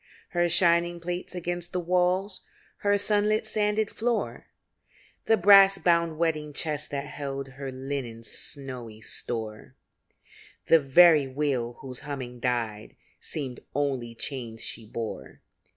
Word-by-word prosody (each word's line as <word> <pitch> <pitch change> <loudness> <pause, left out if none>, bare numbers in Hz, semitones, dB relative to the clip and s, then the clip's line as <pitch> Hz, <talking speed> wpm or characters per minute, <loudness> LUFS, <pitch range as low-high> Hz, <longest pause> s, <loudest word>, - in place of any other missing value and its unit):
Her 175 -1 +1
shining 170 0 +3
plates 175 +2 -5
against 175 0 -4
the 180 - 0
walls, 180 +2 +1 0.3
Her 205 0 +2
sunlit, 210 +1 +2
sanded 215 0 0
floor, 235 0 -2 0.8
The 225 - +5
brass 195 0 +7
bound 170 -3 +2
wedding 155 -3 -1
chest 150 0 -2
that 140 0 -3
held 140 -2 -5
Her 135 0 -7
linen's 130 -4 -5
snowy 125 -6 -2
store, 110 -2 -3 0.9
The 165 - +6
very 150 +1 +6
wheel 130 -3 -1
whose 130 -2 -7
humming 130 -4 -6
died, 115 -3 -2 0.2
Seemed 135 -6 -4 0.2
only 135 -5 -1
chains 115 -3 -4
she 110 - -3
bore. 115 +1 -6
150 Hz, 120 wpm, -27 LUFS, 130-180 Hz, 0.9 s, brass